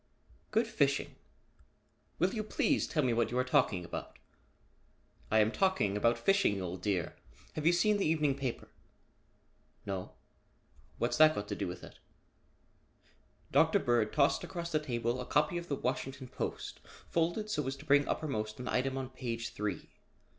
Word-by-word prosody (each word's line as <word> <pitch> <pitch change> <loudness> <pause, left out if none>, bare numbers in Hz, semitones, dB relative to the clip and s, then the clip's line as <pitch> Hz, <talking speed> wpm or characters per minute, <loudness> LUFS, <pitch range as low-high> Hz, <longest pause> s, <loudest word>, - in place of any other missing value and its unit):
"Good 225 +2 +2
fishing? 140 -11 +1 1.0
Will 180 +3 +1
you 215 - -1
please 215 - +1
tell 150 - 0
me 125 -2 +2
what 115 -1 +1
you 125 - -2
are 125 - +3
talking 125 -9 +2
about?" - - -7 1.1
"I 110 - +3
am 110 0 +4
talking 190 - +1
about 115 +3 +3
fishing, 195 - +2
old 90 0 -5
dear. 90 -4 -1 0.4
Have 155 0 -1
you - - +7
seen 210 +4 +3
the 195 - +1
evening 155 -3 +2
paper?" 135 -3 -4 1.2
"No. 95 -2 -4 0.8
What's - - 0
that 155 0 +7
got 105 - -4
to - - -2
do 100 - -3
with 90 0 -7
it?" - - -12 1.5
Dr. - - +5
Bird 120 -3 +1
tossed 145 +2 +3
across 170 -1 -5
the 155 - +2
table 120 -3 -2
a - - -5
copy 150 +4 +2
of 170 - -9
the 145 - -1
Washington 130 0 -3
Post - - -5 0.3
folded 175 +6 0
so 150 -8 -1
as 135 - -2
to 140 +2 -13
bring 145 -1 +4
uppermost 110 -8 -2
an 125 - -5
item 130 +1 0
on 130 -1 -4
page 120 -3 -4
three. 105 -1 -4
135 Hz, 165 wpm, -32 LUFS, 115-155 Hz, 1.5 s, you